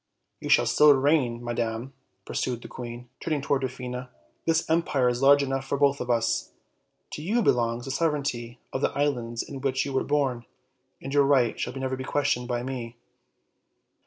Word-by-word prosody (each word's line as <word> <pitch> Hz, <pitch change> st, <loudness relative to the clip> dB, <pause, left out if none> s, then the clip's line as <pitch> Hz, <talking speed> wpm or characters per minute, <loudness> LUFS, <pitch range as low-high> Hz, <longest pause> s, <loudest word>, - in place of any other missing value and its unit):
"You -, -, -6 dB
shall -, -, +5 dB
still 150 Hz, -1 st, +6 dB
reign, 130 Hz, -4 st, +1 dB
madam," 120 Hz, +2 st, -3 dB, 0.3 s
pursued 120 Hz, -2 st, -3 dB
the -, -, -7 dB
queen, 120 Hz, -1 st, -8 dB
turning 155 Hz, -3 st, -1 dB
to -, -, -8 dB
Dwarfina; 125 Hz, -1 st, -5 dB, 0.4 s
"this 165 Hz, 0 st, +2 dB
empire 155 Hz, -6 st, +2 dB
is 120 Hz, +1 st, -2 dB
large 140 Hz, +1 st, +6 dB
enough 135 Hz, 0 st, -2 dB
for 135 Hz, +1 st, -2 dB
both 140 Hz, 0 st, +2 dB
of 125 Hz, -, -5 dB
us. 115 Hz, -1 st, +1 dB, 0.6 s
To -, -, -6 dB
you 220 Hz, +9 st, +1 dB
belongs 120 Hz, -3 st, +1 dB
the 135 Hz, -, -4 dB
sovereignty 135 Hz, -6 st, -1 dB, 0.2 s
of 130 Hz, -, -2 dB
the -, -, +3 dB
islands 120 Hz, -5 st, -1 dB
in 135 Hz, -2 st, -8 dB
which 135 Hz, -1 st, 0 dB
you 140 Hz, -, -4 dB
were 130 Hz, -, +1 dB
born, 135 Hz, -5 st, 0 dB, 0.6 s
and 135 Hz, -, -5 dB
your 145 Hz, -1 st, +5 dB
right 135 Hz, -4 st, +3 dB
shall 125 Hz, -, -2 dB
never 130 Hz, 0 st, -2 dB
be 130 Hz, -, -6 dB
questioned 130 Hz, -3 st, 0 dB
by 120 Hz, -1 st, -2 dB
me. 125 Hz, -2 st, -5 dB
130 Hz, 180 wpm, -26 LUFS, 120-140 Hz, 0.6 s, still